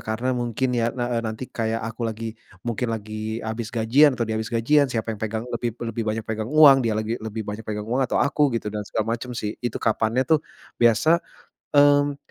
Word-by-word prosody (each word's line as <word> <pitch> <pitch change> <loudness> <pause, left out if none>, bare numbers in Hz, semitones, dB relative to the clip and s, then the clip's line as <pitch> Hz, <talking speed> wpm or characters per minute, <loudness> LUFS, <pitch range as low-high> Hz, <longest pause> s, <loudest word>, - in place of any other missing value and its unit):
karena 120 +4 -2
mungkin 125 +1 -1
ya, 115 -1 +1
eee 120 0 -3
eee, 115 - +1
nanti 110 +2 -4
kayak 115 -2 -3
aku 115 0 -3
lagi 110 0 -5 0.3
mungkin 120 +1 -2
lagi 110 0 -4
habis 110 0 -4
gajian 125 +5 +4
atau 115 - 0
dia 110 - -3
habis 110 - -4
gajian 140 +5 +3
siapa 115 -2 -2
yang 105 - -9
pegang 110 +1 -3
lebih 120 -1 -3
lebih 115 0 -3
banyak 110 0 -2
pegang 110 0 -3
uang, 145 -3 +7
dia 115 -3 0
lagi 110 +2 -2
lebih 110 0 -5
banyak 105 +2 -6
pegang 105 0 -3
uang 125 +4 -1
atau - - 0
aku 145 0 +3
gitu, 105 -2 -4
dan 105 - -3
segala 110 +1 -1
macam 120 +1 -5
sih. 105 0 -2
Itu 120 -2 -3
kapannya 115 +3 +1
tuh 160 -2 +3 0.4
biasa, 120 +9 +4 0.6
mmm, 145 0 +5
115 Hz, 210 wpm, -24 LUFS, 110-125 Hz, 0.6 s, uang